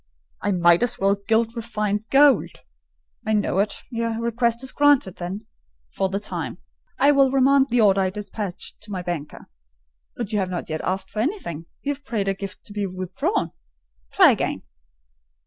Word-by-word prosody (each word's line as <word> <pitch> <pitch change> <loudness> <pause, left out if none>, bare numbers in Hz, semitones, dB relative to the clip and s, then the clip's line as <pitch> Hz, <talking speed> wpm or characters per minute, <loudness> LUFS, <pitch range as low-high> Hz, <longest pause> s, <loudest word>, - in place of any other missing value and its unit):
"I 205 - 0
might 175 -2 +4
as 245 - +2
well 195 +1 +3
'gild 220 +3 0
refined 215 -2 -2
gold.' 280 0 +4 0.6
I 220 -1 -1
know 205 -3 +1
it: 205 +1 -1
your 230 -1 -2
request 235 +1 0
is 265 - 0
granted 285 -10 +3
then—for 175 - -6
the 195 +1 -2
time. 180 -6 -5 0.4
I 280 +2 +5
will 275 -2 +4
remand 270 +1 +4
the 240 0 +3
order 195 -2 +4
I 190 - +1
despatched 200 -1 -6
to 210 0 -9
my 185 -2 -3
banker. 170 -4 -5 0.7
But 235 -3 -5
you 210 - +2
have 190 -2 -1
not 180 -2 -4
yet 155 - -2
asked 190 +1 -2
for 210 - -4
anything; 215 - -3 0.2
you 285 - 0
have 285 0 -13
prayed 215 -7 -2
a 195 - +2
gift 195 0 -8
to 205 - -11
be 205 -1 -2
withdrawn: 185 -1 -2 0.6
try - - +7
again." - - -2
210 Hz, 175 wpm, -23 LUFS, 185-235 Hz, 0.7 s, try